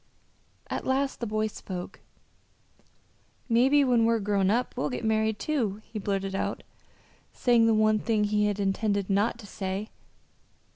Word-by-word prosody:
At - - -4
last 270 +1 0
the 235 - -3
boy 215 +1 0
spoke. 185 -4 -7 1.5
"Mebbe 265 +4 +4
when 240 -2 +3
we're 230 0 +3
grown 200 -2 +1
up 240 +4 0
we'll 250 - -1
get 250 -3 -4
married, 220 0 +1
too," 225 -10 -1
he 220 -1 -6
blurted 195 -1 -2
out, 195 - -2 0.7
saying 235 -2 +3
the 225 - +4
one 215 0 +3
thing 215 -1 +1
he 210 0 +2
had 205 -1 -2
intended 200 0 0
not 205 +4 +1
to 230 - -12
say. 195 +1 -4
215 Hz, 150 wpm, -27 LUFS, 200-235 Hz, 1.5 s, Mebbe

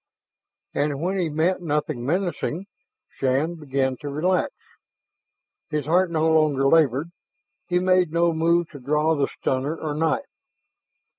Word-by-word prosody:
And 145 -1 -1
when 185 +4 -1
he 170 -3 0
met 165 +5 0
nothing 150 -5 -2
menacing, 175 +3 -2 0.4
Shann 135 +5 0
began 135 -5 -1
to 145 +1 -6
relax. 175 +6 0 1.2
His 150 -1 -2
heart 175 +4 +3
no 160 -1 +1
longer 155 -4 +3
labored; 150 +1 +3 0.6
he 180 - +1
made 185 -2 +3
no 170 0 +2
move 170 +1 +2
to 145 - -10
draw 150 +4 +1
the 145 -3 +1
stunner 135 +4 -2
or 155 -2 -3
knife. 160 - 0
155 Hz, 135 wpm, -24 LUFS, 145-170 Hz, 1.2 s, heart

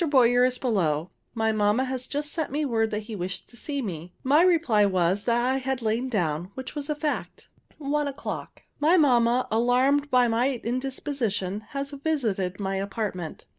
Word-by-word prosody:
Boyer 245 -3 +5
is 255 0 +2
below. 175 - 0 0.2
My 220 -1 +1
mamma 210 +3 +2
has 255 -1 -3
just 295 +1 -2
sent 320 -3 -2
me 300 +2 0
word 225 -4 +1
that 210 0 -2
he 220 0 -7
wished 180 -1 -4
to - - -16
see 280 +3 -4
me. 175 -4 -6
My 285 +5 +5
reply 330 - +4
was, 185 0 +1
that 240 0 +2
I 260 +1 +2
had 265 -2 -2
lain 230 +4 0
down, 175 -6 -1
which 260 0 -6
was 290 0 -6
a 300 - 0
fact. 295 0 -4 0.3
One 295 0 -1
o'clock. 280 +1 -6 0.2
My 320 +5 +4
mamma, 250 -5 +3
alarmed 255 +6 +3
by 250 -2 +4
my 240 +3 +1
indisposition, 240 -6 -2
has 275 0 -3
visited 235 - -1
my 195 -1 -2
apartment. 195 -4 -4
245 Hz, 175 wpm, -26 LUFS, 205-275 Hz, 0.3 s, Boyer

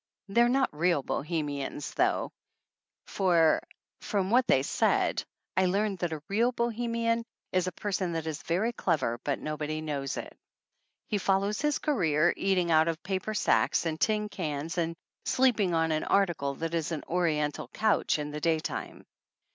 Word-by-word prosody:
They 205 +4 +3
are 240 - +5
not 265 - +1
real 170 -2 +2
Bohemians 145 -2 -3
though, - - +1 0.7
for, 170 -5 +3 0.4
from 195 -1 -1
what 250 +1 +4
they 130 - +4
said, - - +1 0.3
I 190 0 +3
learned 200 +1 0
that 175 -1 -1
a 155 -2 -5
real 225 +5 +2
Bohemian 230 -1 0 0.3
is 185 0 +1
a - - -1
person 190 -4 -2
that 165 -1 -3
is 160 -1 -4
very 200 +8 0
clever, 140 - 0
but 140 - 0
nobody 155 0 -3
knows 145 -4 -3
it. - - -7 0.7
He 205 - -1
"follows 195 +4 +1
his 295 0 +1
career," 175 - +2
eat 195 -1 +1
ing 175 -2 +1
out 160 0 +5
of 165 0 -2
paper 195 +3 -2
sacks 190 - +2
and 160 -1 -2
tin 210 -1 +2
cans 160 -3 -3
and 165 0 -1 0.3
sleep 255 -3 +3
ing 180 -4 +2
on 165 0 +2
an 155 0 0
article 170 -8 +1
that 165 +3 -4
is 165 -1 -1
an 155 -3 -3
oriental 155 -4 0
couch 215 -6 +1
in 150 0 -4
the 150 0 -5
daytime. 160 -1 -2
175 Hz, 170 wpm, -29 LUFS, 155-205 Hz, 0.7 s, are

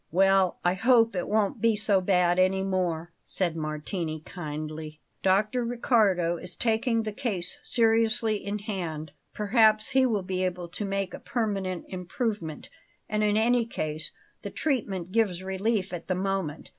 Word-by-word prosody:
"Well, 190 +1 +3
I 175 - +4
hope 230 +2 +4
it 180 - -2
won't 210 -1 +1
be 230 -1 +4
so 205 -2 +2
bad 180 -1 +3
any 190 +1 +3
more," 175 -3 -1
said 175 -4 -1
Martini 155 +1 -3
kindly. 155 -2 -6 0.2
"Dr. 210 +6 +2
Riccardo 215 -8 +2
is 180 +1 -5
taking 230 0 +1
the 215 - -3
case 205 -8 -3
seriously 225 -1 +2
in 200 +1 -2
hand. 170 -8 -4 0.2
Perhaps 215 0 +3
he 265 -1 +4
will 210 -5 0
be 185 0 -2
able 180 -1 -3
to 180 +4 -4
make 195 -1 -2
a - - -6
permanent 195 -6 -2
improvement. 180 - -4 0.4
And, 215 0 0
in 210 0 +2
any 235 +1 +3
case, 155 -7 -4 0.3
the - - -5
treatment 200 - -2
gives 195 -5 +1
relief 190 +1 -1
at 175 - -6
the 185 - 0
moment. 185 -5 -2
195 Hz, 155 wpm, -27 LUFS, 175-220 Hz, 0.4 s, I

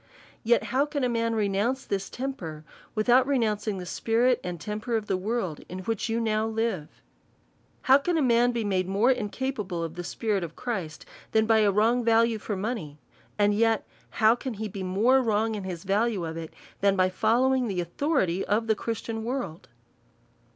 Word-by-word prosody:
Yet.how 250 +4 +2
can 290 -2 -2
a 250 - +2
man 230 -1 0
renounce 215 +5 0
this 195 -1 -3
temper, 175 - -5 0.3
without 245 +4 +4
renouncing 215 -6 0
the 180 - -6
spirit 235 +6 +1
and 180 -2 -5
temper 215 +4 -3
of 215 - -4
the 195 - 0
world, 190 -4 -2
in 185 - -6
which 225 +3 -2
you 225 +1 0
now 220 -1 0
live? 225 -8 -3 0.8
How 265 +2 +6
can 340 +4 0
a - - +2
man 240 -1 +4
be 235 -2 -2
made 190 -3 0
more 205 +7 +3
incapable 210 -6 -2
of 165 -1 -4
the 175 +1 -6
spi 220 +5 -3
rit 195 -3 +1
of 165 -1 -7
Christ, 190 -11 -4 0.3
tlmn 220 0 +4
by 220 0 +4
a 210 -2 +4
wrong 225 +5 +2
value 230 -1 +3
for 210 0 -4
money; 190 -8 -4 0.4
and 205 0 +3
yet 225 +1 +2 0.2
how 220 0 +4
can 245 0 -5
he 215 +1 -4
be 195 -1 -7
more 215 +9 +3
wrong 220 -1 +1
in 205 -3 -5
his 175 -3 -5
value 200 -1 0
of 160 0 -5
it, 165 -1 -6 0.3
than 200 0 +3
by 185 -1 +3
following 245 +6 +2
the 190 -4 -2
authority 185 - 0
of 215 +2 +1
the 220 - +3
Christian 225 0 -4
world? 225 - -4
220 Hz, 185 wpm, -27 LUFS, 190-235 Hz, 0.8 s, How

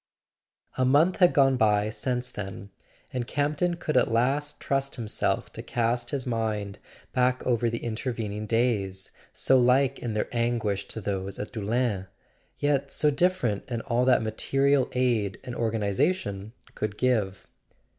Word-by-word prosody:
A - - +4
month 145 +8 +4
had 180 -2 +6
gone 135 -2 +4
by 105 -2 +2
since 125 +3 -2
then; 100 0 -7 0.4
and 125 -2 -2
Campton 150 +5 0
could 165 -2 -3
at 125 - +3
last 135 +6 +1
trust 135 0 -1
himself 115 -3 -2
to - - -6
cast 120 0 -1
his 135 -3 -3
mind 105 -4 -2 0.3
back 125 0 +1
over 120 -1 +2
the 115 +1 -4
intervening 110 -2 -3
days, 105 -5 0 0.2
so 130 0 +3
like 130 +2 +3
in 120 -2 -3
their 105 - -1
anguish 115 -4 0
to 110 - -6
those 95 -1 -3
at 105 - -5
Doullens, 110 -3 -1 0.5
yet 145 -2 +1
so 150 - +3
different 140 - +1
in 120 -2 -2
all 120 0 0
that 125 -3 +4
material 135 +5 +1
aid 115 -6 +1
and 125 - -6
organization 110 - -1 0.2
could 105 -1 -3
give. 110 -7 0
120 Hz, 145 wpm, -27 LUFS, 105-130 Hz, 0.5 s, had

